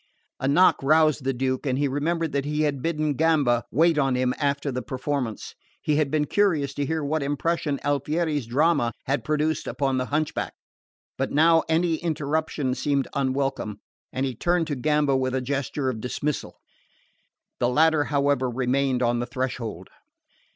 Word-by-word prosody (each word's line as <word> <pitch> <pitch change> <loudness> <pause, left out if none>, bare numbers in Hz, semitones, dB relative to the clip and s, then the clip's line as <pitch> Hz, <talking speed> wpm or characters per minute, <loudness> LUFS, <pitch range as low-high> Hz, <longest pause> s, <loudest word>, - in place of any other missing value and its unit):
A 135 - -1
knock 175 +7 +4
roused 155 -1 +3
the 135 - +2
Duke 130 +2 -2
and 130 -1 0
he 145 +1 +1
remembered 160 +4 -1
that 140 -1 0
he 150 +2 -1
had 145 -3 0
bidden 155 -2 0
Gamba 145 -6 +2
wait 160 +2 +3
on 135 -3 +2
him 125 0 +1
after 140 -1 0
the 125 0 -3
performance. 130 -3 -3 0.3
He 150 -1 0
had 150 -2 +1
been 150 +1 +1
curious 155 -7 +1
to 145 +1 -2
hear 160 0 -1
what 155 +2 -1
impression 145 +1 -1
Alfieri's 145 -1 -1
drama 130 -2 +2
had 140 +2 -1
produced 155 +1 0
upon 135 -2 0
the 130 - -2
hunchback; 150 +1 -2 0.6
but - - -1
now 165 +2 +5
any 165 0 +2
interruption 155 -4 -1
seemed 140 0 0
unwelcome, 135 -6 -1 0.3
and 130 +2 -1
he 130 - -2
turned 175 +7 +1
to 150 -2 -3
Gamba 145 +1 +1
with 130 0 0
a - - +1
gesture 140 +1 -2
of 110 -3 -7
dismissal. 140 +4 -3 1.0
The 120 - +2
latter 155 +2 +3
however 140 -3 +1
remained 130 +1 0
on 120 0 +1
the 120 - -3
threshold. 125 -3 -4
140 Hz, 165 wpm, -25 LUFS, 130-155 Hz, 1.0 s, now